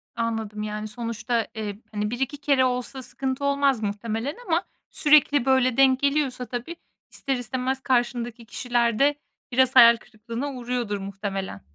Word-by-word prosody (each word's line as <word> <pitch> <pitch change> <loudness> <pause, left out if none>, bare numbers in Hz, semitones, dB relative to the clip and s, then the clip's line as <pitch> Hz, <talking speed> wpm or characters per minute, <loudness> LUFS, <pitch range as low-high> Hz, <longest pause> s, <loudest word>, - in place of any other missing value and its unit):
Anladım. 225 -2 -3
Yani, 215 0 -4
sonuçta, 230 0 -2
eee, 210 -2 -5
hani, 210 0 -2
1-2 265 +4 -2
kere 280 -2 +2
olsa 250 +1 -2
sıkıntı 265 +1 -4
olmaz 280 -3 +2
muhtemelen 220 +6 -3
ama 340 +1 +1 0.3
sürekli 290 -3 +4
böyle 260 -2 +3
denk 265 -1 +5
geliyorsa 280 -3 0
tabii, 245 +8 -5 0.4
ister 270 -2 -2
istemez 255 +2 -2
karşındaki 240 -2 -1
kişiler 235 -1 0
de 290 +1 +4 0.4
biraz 260 +1 +3
hayal 235 -2 +9
kırıklığına 230 +5 -6
uğruyordur 245 -4 -3
muhtemelen. 195 - -5
245 Hz, 140 wpm, -25 LUFS, 220-265 Hz, 0.4 s, hayal